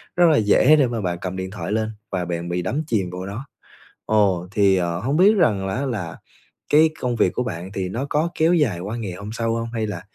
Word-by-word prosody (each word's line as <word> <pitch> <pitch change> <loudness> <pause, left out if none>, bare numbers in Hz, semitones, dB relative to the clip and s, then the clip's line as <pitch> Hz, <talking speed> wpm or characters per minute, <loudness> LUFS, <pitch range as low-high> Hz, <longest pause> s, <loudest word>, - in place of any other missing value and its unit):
rất 175 - +5
là 155 - +4
dễ 110 +8 +5
để 140 -4 +3
mà 115 -2 -3
bạn 90 -3 -2
cầm 95 0 -4
điện 95 0 -5
thoại 100 -3 -5
lên 110 0 -1 0.2
và 90 -2 -2
bạn 85 0 -4
bị 90 0 -1
đắm 145 - -2
chìm 100 - 0
vô 90 +1 -6
đó. 105 +7 -6 0.6
Ồ, 95 -5 +2
thì, 100 -2 +3
ờ, 85 -1 -1
hông 135 - -1
biết 200 +4 +6
rằng 105 - +2
á 125 +9 -2
là 95 - -4 0.5
cái 155 +2 +5
công 125 -1 -1
việc - - +2
của 125 - -1
bạn 95 -5 -6
thì 95 -2 -3
nó 120 +8 -3
có 155 +3 +1
kéo 160 +2 +3
dài 135 - +1
qua 100 +6 -5
ngày 105 -6 -4
hôm 100 +3 -8
sau 115 0 -1
hông? 115 0 -3
Hay 110 -2 -1
là 90 -5 -5
105 Hz, 250 wpm, -22 LUFS, 90-125 Hz, 0.6 s, biết